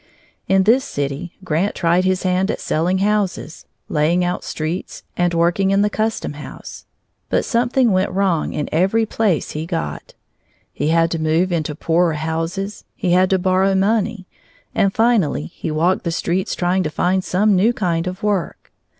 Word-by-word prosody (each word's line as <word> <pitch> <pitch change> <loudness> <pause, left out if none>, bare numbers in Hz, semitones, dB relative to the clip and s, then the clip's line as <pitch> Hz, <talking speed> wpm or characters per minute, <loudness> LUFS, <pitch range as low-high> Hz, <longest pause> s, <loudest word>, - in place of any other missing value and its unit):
In 190 0 +4
this 240 +6 +4
city 140 - -4
Grant 180 +3 0
tried 175 +1 +2
his 185 0 +1
hand 185 +1 +1
at - - -2
selling 175 +4 0
houses, 205 -6 -2 0.2
laying 165 +4 +1
out 180 - -2
streets, 160 +4 -4
and 175 -1 +1
working 175 +3 +2
in 195 +1 +3
the 210 - +1
custom 220 -7 -2
house; 145 0 -10 0.4
but - - +1
something 240 0 +2
went 190 +1 +2
wrong 185 -4 0
in 150 - -3
every 195 +7 +2
place 210 -6 0
he 155 +2 -5
got. 75 - -4 0.6
He 145 - -2
had 165 +1 +3
to 165 - -1
move 160 +4 +1
into 155 -3 -1
poorer 165 +2 +1
houses, 165 +6 -3
he 190 -8 -1
had 185 +1 +4
to 190 - +3
borrow 185 +1 +2
money, 205 0 0 0.5
and 195 - +2
finally 215 - +2
he - - -5
walked 165 +4 +1
the 170 - -1
streets 180 +2 -1
trying 180 +1 +1
to 155 - -1
find 185 +4 0
some 200 +3 +2
new 205 +6 +4
kind 175 -6 -1
of 185 +4 -6
work. 205 -4 -2
185 Hz, 170 wpm, -19 LUFS, 165-195 Hz, 0.6 s, In